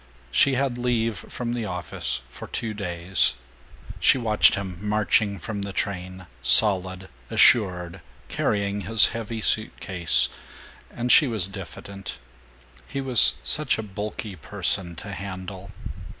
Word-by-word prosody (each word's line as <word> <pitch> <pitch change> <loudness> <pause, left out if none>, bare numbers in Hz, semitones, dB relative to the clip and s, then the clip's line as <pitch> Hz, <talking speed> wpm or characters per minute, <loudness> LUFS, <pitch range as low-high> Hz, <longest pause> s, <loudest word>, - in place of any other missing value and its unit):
She 135 - +3
had 130 -2 -1
leave 115 -2 0
from 120 +5 -6
the 115 -3 -3
office 90 -7 -4
for 65 - -11
two 115 -2 -5
days. 90 -6 0 0.6
She - - +4
watched 110 -4 +3
him 95 -3 -6
marching 105 -1 0
from 100 +3 -6
the 100 0 -5
train, 95 -2 -5 0.2
solid, 95 - +5 0.2
assured, 90 -6 +2 0.3
carrying 100 0 -2
his 115 +1 +4
heavy 115 0 -6
suit 110 0 +2
case, 90 -4 +4 0.6
and 120 +1 -2
she 150 - +6
was 110 -7 +2
diffident 100 0 -9 0.7
he 140 - -5
was 120 - +4
such - - +1
a 110 - -4
bulky 105 0 -6
person 85 +2 -3
to 100 +5 -9
handle. 95 0 -8
100 Hz, 130 wpm, -24 LUFS, 95-110 Hz, 0.7 s, she